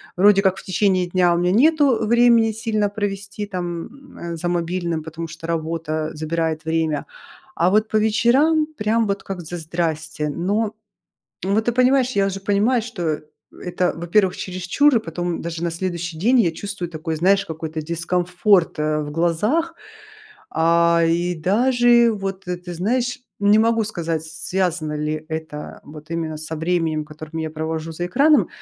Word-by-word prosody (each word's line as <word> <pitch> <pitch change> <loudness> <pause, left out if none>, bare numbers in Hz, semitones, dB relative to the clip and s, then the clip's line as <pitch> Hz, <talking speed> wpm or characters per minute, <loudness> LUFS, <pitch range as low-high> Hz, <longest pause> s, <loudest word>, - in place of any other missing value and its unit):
Вроде 195 +2 +5
как 190 -1 +2
в - - -9
течение 185 -1 +1
дня 175 -1 +3
у - - +1
меня 175 +1 +1
нету 270 - +3
времени 235 -1 +4
сильно 215 -2 -1
провести 205 0 -4
там, 185 +9 -6
э, 170 0 -5
за 170 +2 -3
мобильным, 170 -2 -1
потому 165 +1 -6
что 165 +1 -10
работа, 165 -1 -3 0.2
э, - - -12
забирает 160 +1 -2
время, 160 -2 0 0.5
а 175 - +3
вот 215 +1 +3
по 215 - +2
вечерам 260 +9 +3
прям 220 +1 +1
вот 200 0 -2
как 190 -2 -5
за 175 +2 -6
здрасьте. 160 -2 -3
Но, 205 +8 -1 0.7
вот 200 +3 +1
ты 240 - +1
понимаешь, 255 +1 +3
я 195 - +3
уже 195 0 -3
понимаю, 210 +5 +2
что, 220 -6 -6
э, 155 -2 -1 0.4
это, 180 0 0
во-первых, 180 +3 +1
чересчур, 185 +11 +1
и - - +6
потом 175 -2 -4
даже 170 0 -4
на 170 - 0
следующий 170 -1 -4
день 245 +8 +3
я 170 -6 +2
чувствую 190 -1 -5
такой, 160 0 -4
знаешь, 195 +4 +3
какой-то 160 0 -5
дискомфорт, 175 +3 +1
э, 155 0 0
в 145 -1 -5
глазах. 210 - 0 0.8
А, 170 +1 +3
и 175 +2 +1
даже 235 +6 +3
вот, 195 -2 -5
ты, 180 0 -3
ты 175 0 -8
знаешь, 245 - -1 0.2
не 205 +1 +5
могу 225 0 +3
сказать, 165 -6 -3
с 160 +1 -8
связано 175 -5 0
ли 150 +1 -3
это, 160 -2 -5 0.3
э, - - -18
вот 155 +1 -12
именно 165 -2 -3
со 155 +1 -6
временем, 160 -1 0
которым 155 +1 -8
я 160 - -3
провожу 160 +1 -4
за 175 +2 -3
экраном, 285 - +4
175 Hz, 170 wpm, -21 LUFS, 165-210 Hz, 0.8 s, и